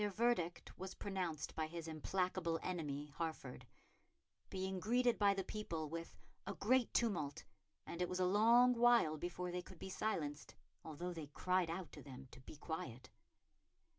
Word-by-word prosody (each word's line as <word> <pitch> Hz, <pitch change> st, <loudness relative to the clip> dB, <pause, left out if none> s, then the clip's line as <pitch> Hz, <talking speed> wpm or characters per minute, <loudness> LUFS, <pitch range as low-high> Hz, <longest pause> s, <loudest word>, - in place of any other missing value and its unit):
Their 210 Hz, -, +2 dB
verdict 205 Hz, -5 st, 0 dB
was 190 Hz, +1 st, -5 dB
pronounced 180 Hz, -6 st, -2 dB
by 160 Hz, -1 st, -1 dB
his 165 Hz, 0 st, -6 dB
implacable 170 Hz, +1 st, 0 dB
enemy, 150 Hz, -5 st, -3 dB
Hertford; 160 Hz, -6 st, -4 dB, 0.8 s
being 190 Hz, 0 st, -2 dB
greeted 240 Hz, +4 st, +3 dB
by 200 Hz, -1 st, +5 dB
the 195 Hz, -, -1 dB
people 170 Hz, -7 st, -3 dB
with 165 Hz, +1 st, -6 dB, 0.3 s
"a -, -, -3 dB
great 250 Hz, +3 st, +3 dB
tumult, 170 Hz, -12 st, 0 dB, 0.4 s
and 170 Hz, -, -5 dB
it 180 Hz, -, +1 dB
was 180 Hz, -, -2 dB
a 185 Hz, -, +4 dB
long 230 Hz, +6 st, +6 dB
while 235 Hz, -9 st, +5 dB
before 175 Hz, +1 st, -3 dB
they 180 Hz, 0 st, -2 dB
could 185 Hz, -, -12 dB
be 190 Hz, -, -6 dB
silenced, 155 Hz, -8 st, -2 dB, 0.3 s
although 170 Hz, +3 st, -4 dB
they 160 Hz, -3 st, -6 dB
cried 180 Hz, +4 st, +1 dB
out 170 Hz, 0 st, -4 dB
to -, -, -9 dB
them 135 Hz, -1 st, -10 dB
to -, -, -12 dB
be 130 Hz, -, -10 dB
quiet." 130 Hz, -5 st, -5 dB
180 Hz, 165 wpm, -39 LUFS, 155-200 Hz, 0.8 s, long